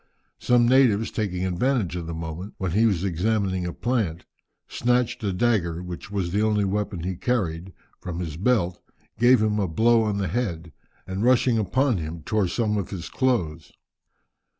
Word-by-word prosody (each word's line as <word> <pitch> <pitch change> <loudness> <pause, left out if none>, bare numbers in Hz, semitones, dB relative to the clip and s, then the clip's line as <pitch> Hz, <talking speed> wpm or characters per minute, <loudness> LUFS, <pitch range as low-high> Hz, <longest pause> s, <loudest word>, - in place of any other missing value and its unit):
Some 120 -1 +3
natives, 120 -4 +4
taking 95 -4 -2
advantage 95 +1 0
of 85 -2 -5
the 85 - -4
moment 80 +4 -6
when 95 -2 -2
he 110 +6 +4
was 95 -5 0
examining 95 0 0
a - - -3
plant, 100 -8 -2 0.4
snatched 125 -1 0
a 100 - 0
dagger, 90 -5 0
which 90 +5 -7
was 95 -4 -2
the 100 +3 +1
only 105 -2 +2
weapon 100 -2 -2
he 95 +1 -2
carried, 95 -6 -2 0.3
from 90 -2 -6
his 80 -4 -4
belt, 95 -2 0 0.4
gave 120 -1 +5
him 105 -1 +1
a 100 - +1
blow 115 +7 +3
on 105 -2 0
the 100 -1 -1
head, 85 -7 -3 0.3
and 95 +2 -3
rushing 125 -1 +3
upon 125 +3 +1
him, 80 0 -6
tore 105 -4 +1
some 105 +2 0
of 95 - -4
his 95 -3 -6
clothes. 90 -12 -1
100 Hz, 175 wpm, -24 LUFS, 85-115 Hz, 0.4 s, gave